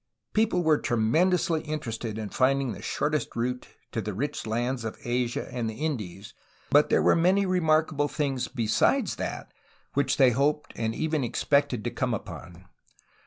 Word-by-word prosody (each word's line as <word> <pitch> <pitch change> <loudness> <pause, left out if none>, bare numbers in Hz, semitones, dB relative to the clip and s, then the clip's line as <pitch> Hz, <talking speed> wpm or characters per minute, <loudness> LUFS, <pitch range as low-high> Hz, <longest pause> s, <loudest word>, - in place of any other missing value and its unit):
People 215 -5 +2
were 155 -2 +4
tremendously 160 +9 +2
interested 120 -8 -4
in 110 -2 -4
finding 135 +1 +2
the - - -7
short 150 +1 -1
est 150 - -2
route 125 +2 -2 0.2
to 115 - -2
the 105 -1 -4
rich 135 +1 -3
lands 120 +2 -1
of 110 - -5
Asia 120 -1 -1
and 120 -3 -2
the 110 - -6
Indies, 110 - -4 0.4
but 145 +1 +5
there - - +3
were - - +5
many 185 +4 +3
remarkable 155 -5 +2
things 140 -4 -2
besides 115 -5 +1
that - - -5 0.4
which 140 0 +1
they 130 -3 +6
hoped 145 +5 0
and 115 -1 -2
even 155 -3 0
expected 130 0 +1
to 120 - -2
come 125 -3 -1
upon. 90 -3 -9
130 Hz, 165 wpm, -27 LUFS, 115-155 Hz, 0.4 s, they